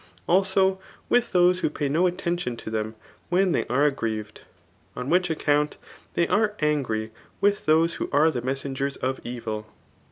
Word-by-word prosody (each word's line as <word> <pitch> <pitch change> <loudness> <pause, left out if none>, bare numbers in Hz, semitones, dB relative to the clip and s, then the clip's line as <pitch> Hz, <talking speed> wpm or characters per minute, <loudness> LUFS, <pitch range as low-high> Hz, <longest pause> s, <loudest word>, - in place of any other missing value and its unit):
Abo 190 +1 +3 0.3
with 245 -1 +2
those 180 0 +4
who - - +1
pay 150 -1 -2
no 165 +6 +3
attention 175 -8 -2
to 110 - -7
them 110 0 -2 0.3
when 185 +2 +3
they - - 0
are 140 +5 +3
agg^rieved; 110 -5 -4 0.6
on 125 - -4
which 180 0 +3
account 150 -2 +1 0.4
they 170 - +2
are 210 0 +2
angry 125 -8 0 0.3
with 205 -3 +1
those 165 +2 +4
who - - -2
are 150 +3 +4
the 125 - -3
messenger^ 135 +2 -3
of 130 +1 -2
evil. 110 -3 -5
150 Hz, 160 wpm, -25 LUFS, 125-180 Hz, 0.6 s, those